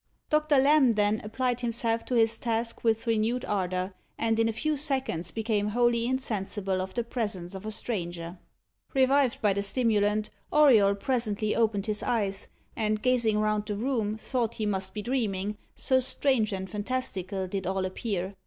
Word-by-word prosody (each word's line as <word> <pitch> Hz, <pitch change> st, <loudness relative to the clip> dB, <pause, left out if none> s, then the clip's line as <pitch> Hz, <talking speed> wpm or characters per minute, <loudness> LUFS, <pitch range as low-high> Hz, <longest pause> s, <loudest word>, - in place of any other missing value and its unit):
Doctor 305 Hz, -1 st, +3 dB
Lamb 275 Hz, -2 st, +5 dB
then 210 Hz, 0 st, +1 dB
applied 245 Hz, +3 st, -1 dB
himself 230 Hz, -1 st, +1 dB
to 250 Hz, -, -2 dB
his 225 Hz, -1 st, +3 dB
task 230 Hz, 0 st, -2 dB
with 225 Hz, 0 st, +1 dB
renewed 230 Hz, +2 st, 0 dB
ardour, 185 Hz, -1 st, -2 dB, 0.2 s
and 225 Hz, 0 st, 0 dB
in 225 Hz, 0 st, +3 dB
a -, -, +1 dB
few 310 Hz, +7 st, -1 dB
seconds 265 Hz, -, -1 dB
became 215 Hz, -1 st, -1 dB
wholly 235 Hz, +1 st, +2 dB
insensible 205 Hz, -7 st, -2 dB
of 185 Hz, 0 st, -6 dB
the 240 Hz, -, 0 dB
presence 205 Hz, -7 st, -3 dB
of 190 Hz, +2 st, -7 dB
a -, -, -3 dB
stranger. 175 Hz, -6 st, -4 dB, 0.6 s
Revived 270 Hz, 0 st, +3 dB
by 205 Hz, -2 st, +4 dB
the 200 Hz, -, -1 dB
stimulant, 210 Hz, -1 st, +2 dB, 0.2 s
Auriol 230 Hz, -10 st, +5 dB
presently 215 Hz, -2 st, -1 dB
opened 215 Hz, -3 st, +1 dB
his 210 Hz, -1 st, +3 dB
eyes, 205 Hz, -4 st, -1 dB, 0.3 s
and 215 Hz, -1 st, -1 dB
gazing 240 Hz, -4 st, +3 dB
round 210 Hz, 0 st, 0 dB
the 210 Hz, -, -2 dB
room, 220 Hz, -2 st, -1 dB
thought 235 Hz, 0 st, -2 dB
he 215 Hz, -, -2 dB
must 190 Hz, -1 st, -2 dB
be 210 Hz, -, -4 dB
dreaming, 210 Hz, -5 st, -1 dB, 0.2 s
so 260 Hz, -1 st, +3 dB
strange 255 Hz, -3 st, +1 dB
and 190 Hz, -1 st, -4 dB
fantastical 205 Hz, -4 st, -3 dB
did 190 Hz, 0 st, -4 dB
all 190 Hz, 0 st, -1 dB
appear. 185 Hz, 0 st, -3 dB
220 Hz, 165 wpm, -28 LUFS, 200-245 Hz, 0.6 s, Lamb